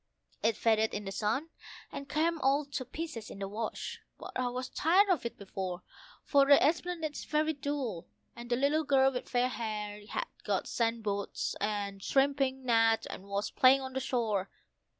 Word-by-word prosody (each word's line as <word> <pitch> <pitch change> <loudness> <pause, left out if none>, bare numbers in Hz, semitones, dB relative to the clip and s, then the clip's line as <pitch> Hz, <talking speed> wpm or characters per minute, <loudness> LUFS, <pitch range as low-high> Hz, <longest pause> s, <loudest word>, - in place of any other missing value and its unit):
It 225 0 +2
faded 220 -1 +2
in 210 0 -4
the 195 - -4
sun, 225 - -1 0.4
and 280 0 -7
came 330 +2 +1
all 275 +2 +3
to 275 -2 -4
pieces 255 -4 -6
in - - -9
the 195 0 -4
wash; 215 +3 -4 0.2
but - - -8
I 255 -1 0
was 250 +1 -3
tired 370 +9 +3
of 330 -10 +2
it - - -10
before. 190 -2 -5 0.4
For 280 -1 +4
the 285 0 +8
esplanade 330 0 0
is - - -7
very 310 +1 +1
dull, 270 - -3 0.3
and 240 0 -9
the 240 - +3
little 285 +5 +2
girl 270 -2 +4
with 250 - -5
fair 245 0 +2
hair 210 -3 -4
had - - -2 0.2
got - - 0
sand 230 -1 0
boots 200 -1 -2
and 200 -1 -2
a - - -11
shrimping 270 -1 +1
net 225 -2 +4
and 190 - -8
was 200 +1 -2
playing 265 +1 +6
on 260 0 -6
the 265 - -1
shore. 220 -7 -1
250 Hz, 190 wpm, -31 LUFS, 215-280 Hz, 0.4 s, the